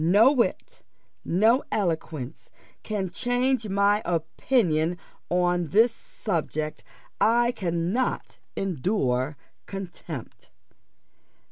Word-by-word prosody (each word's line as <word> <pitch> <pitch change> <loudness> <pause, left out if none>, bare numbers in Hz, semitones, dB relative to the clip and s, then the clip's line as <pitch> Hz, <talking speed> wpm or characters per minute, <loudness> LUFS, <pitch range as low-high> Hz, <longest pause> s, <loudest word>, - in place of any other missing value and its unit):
No 205 +10 +6
wit, 255 -5 -1 0.4
no 220 +9 +3
eloquence, 160 - -2 0.3
can 195 -4 -3
change 245 0 0
my 200 +2 +3
opinion 170 0 +1 0.3
upon 175 -1 +2
this 225 +7 +4
subject 155 -8 -3 0.4
I 240 +2 +4
cannot 180 +5 -1 0.2
endure 150 - 0 0.3
contempt." 175 - -8
190 Hz, 80 wpm, -26 LUFS, 165-225 Hz, 0.4 s, No